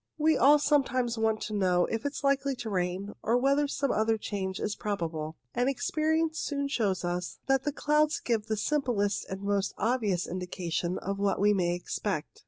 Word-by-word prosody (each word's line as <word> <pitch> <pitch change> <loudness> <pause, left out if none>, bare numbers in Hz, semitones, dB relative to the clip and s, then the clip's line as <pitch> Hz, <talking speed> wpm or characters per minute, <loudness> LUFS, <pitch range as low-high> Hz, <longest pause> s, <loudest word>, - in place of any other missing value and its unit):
We 315 0 +3
all 285 +4 +6
sometimes 260 -5 +1
want 220 -1 +1
to 215 - -4
know 180 -3 +2
if 225 +2 -3
it 285 - -4
is - - -6
likely 275 0 +2
to 230 -3 -5
rain, 185 +2 -2
or 230 +3 +2
whether 280 +3 +2
some 280 -1 -1
other 220 +1 +2
change 190 -3 -4
is 210 - -2
probable; 165 -6 -3 0.2
and 245 +2 +1
experience 315 +3 0
soon 280 -1 -2
shows 200 -9 0
us 175 0 -3
that 270 -1 +2
the 295 - +1
clouds 300 +1 +2
give 225 -3 -1
the 220 -1 -1
simplest 230 -6 0
and 190 +1 -5
most 200 0 0
obvious 215 -6 0
indication 180 -1 -3
of 195 +1 -4
what 200 0 +1
we 205 +1 +4
may 175 -3 +1
expect. 175 -1 -4
220 Hz, 190 wpm, -29 LUFS, 190-275 Hz, 0.2 s, all